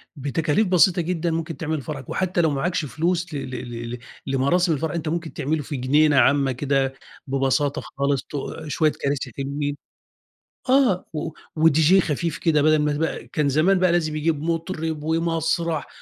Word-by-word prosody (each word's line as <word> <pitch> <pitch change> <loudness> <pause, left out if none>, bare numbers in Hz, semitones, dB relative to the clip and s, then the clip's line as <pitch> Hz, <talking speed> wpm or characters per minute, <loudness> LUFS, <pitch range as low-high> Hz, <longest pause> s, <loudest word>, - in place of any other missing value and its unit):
بتكاليف 150 +7 0
بسيطة 180 0 +4
جدًا 170 0 -1
ممكن 165 0 -3
تعمل 155 -2 -2
فرحك، 135 -3 -7
وحتى 185 -2 0
لو 160 - +3
معاكش 160 +3 -1
فلوس 170 +6 -1
ل - - -2
ل 135 - -5
ل 120 -1 -6
ل - - -11 0.3
لمراسم 155 +6 +2
الفرح، 155 +1 -2
أنت 165 -2 -4
ممكن 165 -1 -3
تعمله 150 +2 -1
في 145 - -5
جنينة 145 +3 +3
عامة 135 +1 +4
كده 135 0 0 0.3
ببساطة 135 +1 +1
خالص، 140 -1 -1
ت - - -23 0.4
شوية 155 +1 +2
كراسي 140 -3 -3
حلوين 145 +1 -3 0.9
آه، 255 -9 +3
و 155 - -3 0.3
وDJ 160 +4 +5
خفيف 160 +1 -2
كده، 155 -4 +2
بَدَل 155 0 +4
ما 150 0 +1
بقى 160 +1 -2
كان 150 -2 0
زمان 175 +7 +3
بَقى 185 -2 +3
لازم 155 -3 0
يجيب 155 -1 0
مطرب 165 -2 -2
ومسرح 165 0 0
155 Hz, 165 wpm, -23 LUFS, 140-165 Hz, 0.9 s, وDJ